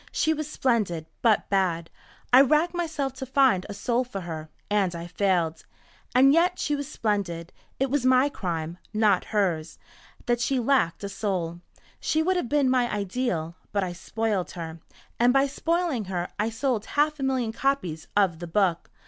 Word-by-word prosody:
"She 315 - +2
was 310 -1 -4
splendid 215 - 0 0.2
but 220 -4 +3
bad. 175 -4 +1 0.4
I 255 - +10
racked 305 +6 +3
myself 315 -6 -2
to 265 - -4
find 260 -8 +3
a 205 - -5
soul 240 +4 0
for 220 -6 -6
her, 160 -3 -6 0.2
and 200 -4 +1
I 170 0 -5
failed. 175 -3 0 0.5
And 270 +2 +7
yet 355 +3 +3
she 295 - 0
was 285 -1 -4
splendid. 190 - -2 0.3
It 270 -1 0
was 285 -2 +1
my 255 +1 +5
crime 170 - -4 0.2
not 210 -4 +3
hers 180 -7 -1 0.5
that 240 -1 +1
she 265 +2 +1
lacked 240 -9 +1
a 200 - -3
soul. 185 -4 -3 0.4
She 315 +1 +1
would 375 +3 +2
have 355 -10 -1
been 290 -2 +3
my 250 -2 +2
ideal, 200 -5 -2 0.2
but 200 -1 0
I 180 -1 -3
spoiled 205 +1 -2
her. 165 -1 -7 0.4
And 240 +1 +5
by 270 0 +4
spoiling 330 - -1
her 180 -2 -3
I 215 +2 +1
sold 230 -2 -1
half 300 +1 +2
a - - -3
million 260 -4 0
copies 225 - -1
of 185 -5 +3
the 175 - -6
book. 175 -1 +1
220 Hz, 175 wpm, -26 LUFS, 180-270 Hz, 0.5 s, I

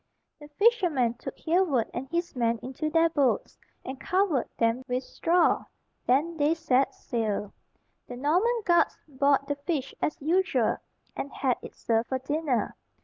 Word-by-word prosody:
The 295 - -11
fishermen 355 - +3
took - - -7
Hereward 320 -8 +1
and 260 +2 -5
his 340 -1 -2
men 235 -2 +1
into 265 +5 -3
their 330 +1 +4
boats, 285 -6 0 0.3
and 260 0 -6
covered 365 -9 +1
them 230 +2 +1
with 250 0 -1
straw; 340 +5 +2 0.4
then 310 +7 +2
they 300 +2 +2
set 270 -4 +1
sail. 215 -4 -2 0.5
The 245 - -7
Norman 375 - +1
guards 345 -1 +3
bought 280 0 +2
the 285 - -2
fish 285 -2 -3
as 305 - -1
usual, 310 - +1 0.4
and 280 - -4
had 255 -3 0
it - - -10
served 225 0 0
for 260 - 0
dinner. 285 -1 -1
285 Hz, 150 wpm, -27 LUFS, 250-335 Hz, 0.5 s, their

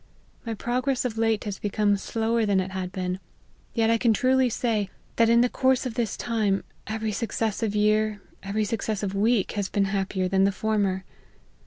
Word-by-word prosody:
My 225 - -2
progress 250 +4 -1
of 225 -2 -2
late 225 -2 +2
has 205 -3 -5
become 205 0 +1
slower 225 +3 0
than 200 -3 +2
it 190 0 -2
had 185 -1 -4
been: 185 0 -3 0.6
yet 225 0 +3
I 230 - +3
can 230 -1 +4
truly 260 +3 +3
say, 220 -4 0 0.3
that 230 -1 +5
in 235 0 +6
the 245 - +4
course 260 +1 +2
of 250 - -3
this 230 -3 -2
time, 215 -4 0 0.2
every 220 0 -2
successive 220 -1 -1
year, 215 0 +2 0.2
every 210 +2 -1
successive 210 -2 -2
week, 210 +1 +2
has 200 -3 -2
been 200 -1 +1
happier 195 -1 -1
than 190 +1 +2
the 200 - +4
former. 200 -2 0
215 Hz, 180 wpm, -26 LUFS, 195-230 Hz, 0.6 s, in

